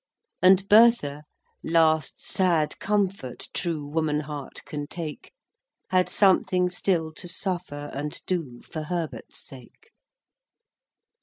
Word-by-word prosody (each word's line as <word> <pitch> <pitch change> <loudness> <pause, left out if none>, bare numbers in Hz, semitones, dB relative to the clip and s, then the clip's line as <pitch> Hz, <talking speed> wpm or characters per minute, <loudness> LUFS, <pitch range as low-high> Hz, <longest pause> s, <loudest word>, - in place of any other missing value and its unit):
And 190 +1 +5
Bertha—last 160 - +2
sad 170 -5 +1
comfort 195 -10 -1
True 165 -5 -2
woman 150 0 0
heart 145 -2 -7
can 145 -1 -5
take— 160 -2 -7 0.6
Had 185 -1 +3
something 185 -2 +3
still 170 -3 0
to 175 - -4
suffer 175 -5 -3
And 145 +2 -4
do 155 -10 -3
for 160 - -6
Herbert's 170 -1 -4
sake. 135 - -15
165 Hz, 100 wpm, -26 LUFS, 150-185 Hz, 0.6 s, And